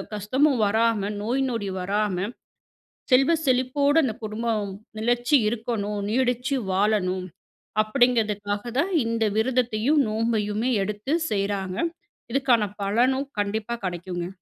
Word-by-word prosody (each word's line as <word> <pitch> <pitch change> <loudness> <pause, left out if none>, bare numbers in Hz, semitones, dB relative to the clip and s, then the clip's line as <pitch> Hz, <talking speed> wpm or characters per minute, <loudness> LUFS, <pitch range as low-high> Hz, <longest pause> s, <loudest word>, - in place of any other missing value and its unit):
கஷ்டமும் 260 +7 +2
வராம, 220 +1 +2 0.2
நோய் 250 +5 0
நொடி 225 -5 -3
வராம, 200 0 0 0.9
செல்வ 270 +6 +5
செழிப்போட 270 +3 +2
அந்த 230 - -1
குடும்பம் 215 -1 -2 0.3
நெலைச்சி 240 +5 +2
இருக்கணும், 215 -3 -3
நீடிச்சி 250 +3 +1 0.2
வாழணும் 190 -2 +1 0.6
அப்டீங்கிறதுக்காக 215 -3 +1 0.2
தான் 385 +6 -1
இந்த 230 0 0
விரதத்தையும் 250 +3 +2
நோம்பையுமே 220 +1 0
எடுத்து 210 +8 -2 0.2
செய்றாங்க. 195 -2 -2 0.5
இதுக்கான 255 -4 +3 0.2
பலனும் 250 +7 +2
கண்டிப்பா 210 +3 -2
கடைக்குங்க. 175 0 -4
225 Hz, 100 wpm, -25 LUFS, 205-250 Hz, 0.9 s, செல்வ